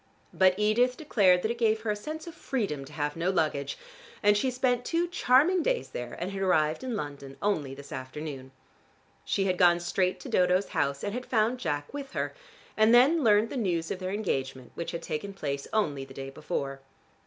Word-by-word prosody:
But 185 Hz, -1 st, +4 dB
Edith 235 Hz, +4 st, +2 dB
declared 190 Hz, -, +3 dB
that 220 Hz, -, +1 dB
it 235 Hz, -, -5 dB
gave 220 Hz, -1 st, +2 dB
her 220 Hz, -1 st, -1 dB
a -, -, 0 dB
sense 310 Hz, +10 st, -6 dB
of 335 Hz, -, -8 dB
freedom 205 Hz, -, -3 dB
to 145 Hz, -, -13 dB
have 150 Hz, -1 st, -2 dB
no 170 Hz, +2 st, 0 dB
luggage, 150 Hz, -6 st, 0 dB, 0.5 s
and 205 Hz, 0 st, +5 dB
she 235 Hz, +6 st, +1 dB
spent 250 Hz, -1 st, +1 dB
two 340 Hz, +5 st, 0 dB
charming 340 Hz, +2 st, +4 dB
days -, -, 0 dB
there, 120 Hz, 0 st, -6 dB
and 180 Hz, +3 st, -3 dB
had 195 Hz, 0 st, -4 dB
arrived 160 Hz, -1 st, +2 dB
in 255 Hz, -3 st, -2 dB
London 140 Hz, -6 st, -6 dB
only 150 Hz, -10 st, -1 dB
this 140 Hz, 0 st, -12 dB
afternoon. 130 Hz, 0 st, -6 dB, 0.7 s
She 195 Hz, -, 0 dB
had 185 Hz, -2 st, 0 dB
gone 175 Hz, -1 st, +6 dB
straight 180 Hz, +1 st, 0 dB
to -, -, -8 dB
Dodo's 180 Hz, +2 st, +2 dB
house, 140 Hz, 0 st, -1 dB
and 205 Hz, -, -2 dB
had 250 Hz, +1 st, -5 dB
found 230 Hz, +2 st, +1 dB
Jack 145 Hz, -, -3 dB
with 280 Hz, -2 st, -6 dB
her -, -, -2 dB, 0.4 s
and 220 Hz, +2 st, +5 dB
then 285 Hz, +6 st, +5 dB
learned 215 Hz, 0 st, +4 dB
the -, -, -3 dB
news 175 Hz, -8 st, -1 dB
of 185 Hz, -, -3 dB
their 185 Hz, -1 st, -3 dB
engagement 135 Hz, -, -3 dB
which 170 Hz, -, -5 dB
had 170 Hz, -, -5 dB
taken 195 Hz, +6 st, -4 dB
place 140 Hz, -5 st, -3 dB
only 150 Hz, -11 st, 0 dB
the 135 Hz, 0 st, -12 dB
day 135 Hz, 0 st, -6 dB
before. 135 Hz, 0 st, -4 dB
190 Hz, 205 wpm, -28 LUFS, 150-235 Hz, 0.7 s, gone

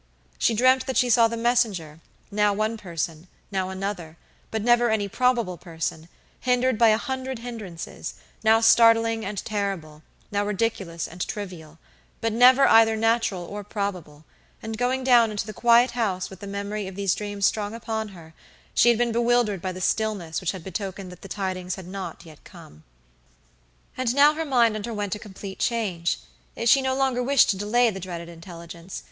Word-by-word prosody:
She 230 Hz, -, +2 dB
dreamt 255 Hz, +3 st, +3 dB
that 260 Hz, -, -1 dB
she 250 Hz, -1 st, +3 dB
saw 230 Hz, 0 st, +6 dB
the 230 Hz, +1 st, -4 dB
messenger, 220 Hz, -10 st, 0 dB, 0.3 s
now 210 Hz, 0 st, +2 dB
one 215 Hz, +2 st, -1 dB
person, 170 Hz, -4 st, -5 dB, 0.2 s
now 190 Hz, -1 st, -1 dB
another, 190 Hz, -4 st, -5 dB, 0.3 s
but 220 Hz, -1 st, -3 dB
never 240 Hz, 0 st, +4 dB
any 215 Hz, -2 st, 0 dB
probable 235 Hz, -4 st, +1 dB
person, 165 Hz, -1 st, -5 dB, 0.3 s
hindered 250 Hz, 0 st, +1 dB
by 230 Hz, -, +6 dB
a 215 Hz, -1 st, +5 dB
hundred 260 Hz, +1 st, -4 dB
hinderances, 225 Hz, -8 st, -7 dB, 0.3 s
now 225 Hz, +1 st, +5 dB
startling 225 Hz, 0 st, +5 dB
and 205 Hz, 0 st, -5 dB
terrible, 195 Hz, -8 st, -3 dB, 0.3 s
now 205 Hz, 0 st, 0 dB
ridiculous 195 Hz, -5 st, -2 dB
and 175 Hz, +2 st, -10 dB
trivial, 175 Hz, -6 st, -7 dB, 0.4 s
but 225 Hz, -1 st, -1 dB
never 255 Hz, +4 st, +6 dB
either 225 Hz, -2 st, +6 dB
natural 225 Hz, -4 st, +1 dB
or 205 Hz, +3 st, -7 dB
probable; 185 Hz, -8 st, -5 dB, 0.4 s
and 220 Hz, 0 st, -4 dB
going 255 Hz, +1 st, 0 dB
down 240 Hz, -3 st, +5 dB
into 210 Hz, -1 st, -3 dB
the 215 Hz, -, -7 dB
quiet 235 Hz, +2 st, +4 dB
house 200 Hz, -7 st, -2 dB
with 190 Hz, -, -11 dB
the 200 Hz, -, -8 dB
memory 200 Hz, 0 st, -4 dB
of 190 Hz, -, -8 dB
these 200 Hz, -2 st, +1 dB
dreams 205 Hz, -1 st, -2 dB
strong 210 Hz, +1 st, 0 dB
upon 220 Hz, -1 st, -3 dB
her, 170 Hz, -5 st, -13 dB, 0.4 s
she 240 Hz, -, +5 dB
had 235 Hz, -, +4 dB
been 240 Hz, 0 st, +1 dB
bewildered 235 Hz, -4 st, +1 dB
by 185 Hz, 0 st, -3 dB
the 185 Hz, -, -8 dB
stillness 200 Hz, -6 st, -1 dB
which 185 Hz, -, 0 dB
had 190 Hz, -4 st, -9 dB
betokened 190 Hz, 0 st, -5 dB
that 180 Hz, -, -13 dB
the -, -, -9 dB
tidings 185 Hz, -2 st, -3 dB
had 190 Hz, -, -10 dB
not 185 Hz, -3 st, -7 dB
yet 155 Hz, -2 st, -15 dB
come. 75 Hz, +1 st, -15 dB, 1.1 s
And 255 Hz, -1 st, -1 dB
now 290 Hz, +2 st, +6 dB
her 320 Hz, +1 st, -3 dB
mind 240 Hz, -6 st, +3 dB
underwent 210 Hz, -2 st, -3 dB
a 210 Hz, -, -5 dB
complete 195 Hz, -2 st, -9 dB
change. 195 Hz, -8 st, -1 dB, 0.5 s
She 270 Hz, +4 st, +6 dB
no 260 Hz, 0 st, 0 dB
longer 265 Hz, -2 st, +1 dB
wished 270 Hz, 0 st, +4 dB
to -, -, -2 dB
delay 225 Hz, +4 st, +2 dB
the 195 Hz, -, -7 dB
dreaded 170 Hz, -2 st, -7 dB
intelligence. 170 Hz, +1 st, -9 dB
210 Hz, 175 wpm, -25 LUFS, 185-235 Hz, 1.1 s, saw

